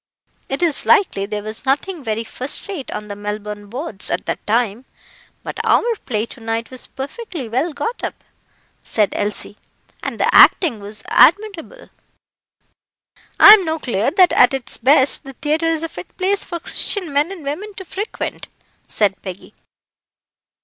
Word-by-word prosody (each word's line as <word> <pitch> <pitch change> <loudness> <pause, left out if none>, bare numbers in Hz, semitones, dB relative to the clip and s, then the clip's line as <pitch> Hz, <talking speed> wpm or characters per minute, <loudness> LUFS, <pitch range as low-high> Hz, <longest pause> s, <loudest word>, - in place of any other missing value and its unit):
"It 270 +6 -2
is 320 -4 0
likely 375 - +3
there 210 0 -4
was 215 +1 -5
nothing 295 +5 -1
very 225 -1 -2
first 255 - -4
rate 365 -10 -6
on 210 - -6
the 205 - -6
Melbourne 210 0 -6
boards 230 - -5
at - - -2
that - - -4
time, 230 +2 0 0.6
but - - -6
our - - +3 0.2
play 220 -3 -1
to 240 - -13
night 225 +1 -3
was 255 - -7
perfectly 305 - -7
well 260 +9 -1
got 455 +10 -4
up," - - -5 0.6
said 210 -3 0
Elsie, 205 0 -3 0.4
"and - - -5
the - - +2
acting 300 - +6
was 205 +1 -7
admirable." 415 +5 +2 1.5
"I'm 420 -1 +10
no 320 -1 -1
clear 230 -8 -1
that 365 0 +4
at 250 +2 +5
its 265 - -1
best 265 +2 +4
the 270 - -10
theatre 310 +5 0
is 325 -1 0
a - - -1
fit 325 - -11
place 390 +2 +1
for 340 -2 -6
Christian 345 -1 -2
men 295 +5 +1
and 370 -5 -9
women 375 +9 -5
to 380 -3 -9
frequent," 410 +5 -5 0.4
said 200 -3 0
Peggy. 185 -1 -9
270 Hz, 160 wpm, -19 LUFS, 215-345 Hz, 1.5 s, I'm